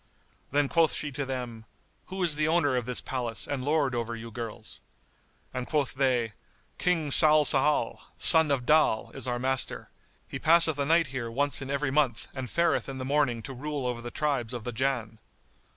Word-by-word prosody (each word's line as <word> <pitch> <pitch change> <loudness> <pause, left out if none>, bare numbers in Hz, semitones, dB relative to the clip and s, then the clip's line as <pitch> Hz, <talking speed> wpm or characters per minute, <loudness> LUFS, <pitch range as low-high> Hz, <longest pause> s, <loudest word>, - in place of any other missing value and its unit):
Then 145 0 +1
quoth 165 +1 +2
she 150 - -3
to 140 0 -4
them, 120 -4 -6 0.4
"Who 190 0 -4
is 165 -4 +1
the 150 0 +1
owner 160 -5 +2
of 125 -1 -2
this 125 - -1
palace 120 -4 -4
and 140 -3 -3
lord 145 -2 +1
over 115 -1 -3
you 115 0 -9
girls?" 115 -1 -7 0.7
and 125 -1 -4
quoth 150 -3 -1
they, 125 -5 0 0.5
"King 165 -5 0
Salsál, 150 -4 +4 0.2
son 160 -2 +5
of 135 -4 0
Dal, 150 -7 +2
is - - -6
our 120 -1 -1
master; 130 +1 -1 0.4
he - - -6
passeth 160 -2 +4
a 140 - +1
night 165 +1 +4
here 120 -3 -4
once 140 +5 0
in 135 - -6
every 140 0 -1
month 135 -6 0
and 130 -3 -6
fareth 170 -4 0
in 135 - -6
the 130 - -5
morning 135 -5 0
to 135 - -7
rule 145 +1 -4
over 120 -1 -3
the 120 - -6
tribes 130 -4 -2
of 120 - -6
the 125 - -4
Jann." 120 -3 -2
135 Hz, 190 wpm, -27 LUFS, 120-150 Hz, 0.7 s, son